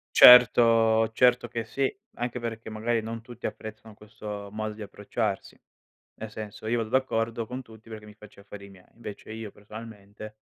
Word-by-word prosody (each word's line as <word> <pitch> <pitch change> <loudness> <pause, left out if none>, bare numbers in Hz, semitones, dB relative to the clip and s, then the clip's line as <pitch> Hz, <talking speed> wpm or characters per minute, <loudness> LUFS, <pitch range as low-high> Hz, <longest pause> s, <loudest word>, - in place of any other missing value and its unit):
Certo 115 -2 +8
certo 125 0 +3
che 115 -1 -4
sì, 135 +4 -1 0.3
anche 120 0 -3
perché 115 -1 -6
magari 115 +2 -1
non 115 +1 -6
tutti 120 0 -7
apprezzano 110 0 -8
questo 105 -1 -8
modo 110 0 -4
di 110 - -9
approcciarsi. 105 0 -4 0.6
Nel 110 -1 -6
senso 110 0 -8
io 115 +2 +1
vado 110 -1 -3
d'accordo 115 -3 0
con 125 +2 -6
tutti 110 -1 -17
perché 110 -1 -9
mi 105 - -12
faccio 105 -1 -16
gli 100 - -18
affari 100 0 -11
miei. 95 -2 -17
Invece 110 -1 -9
io 110 -1 -7
personalmente, 105 0 -11
110 Hz, 170 wpm, -27 LUFS, 105-115 Hz, 0.6 s, Certo